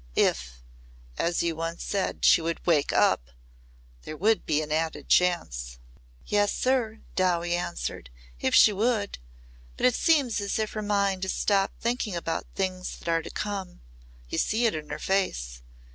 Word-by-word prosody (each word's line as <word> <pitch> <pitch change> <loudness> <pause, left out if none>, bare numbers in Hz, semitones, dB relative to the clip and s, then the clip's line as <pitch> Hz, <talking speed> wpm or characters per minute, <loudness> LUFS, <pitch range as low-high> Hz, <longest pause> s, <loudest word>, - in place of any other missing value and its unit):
If 60 -1 0 0.6
as 170 0 +1
you 170 - +1 0.3
said 195 -2 -1
once - - -2
she 170 - +6
would 165 +1 -3
'wake 155 -5 +3
up' - - +2 0.7
there 155 - -8
would 215 +5 +2
be 150 -1 +2
an 150 - -7
added 160 +1 -2
chance." - - +1 0.5
"Yes, 205 -1 +2
sir," 245 -4 0
Dowie 175 -2 +1
answered. 60 - -4 0.3
"If - - +1
she 210 - +7
would. 210 - 0 0.6
But - - 0
it 250 - +5
seems 280 -10 +2
as 200 - -2
if 215 -1 -2
her 215 - -3
mind 200 -2 0
has 190 - -1
stopped 195 -1 +1
thinking 235 -4 -1
about 165 -1 -3
things 185 -1 -3
that - - -7
are 165 0 +2
to - - -8
come. 195 -3 -5 0.5
You - - -2
see 230 +3 +1
it 225 - +3
in 155 -1 -6
her - - -4
face. 60 - -1
185 Hz, 165 wpm, -27 LUFS, 160-210 Hz, 0.7 s, she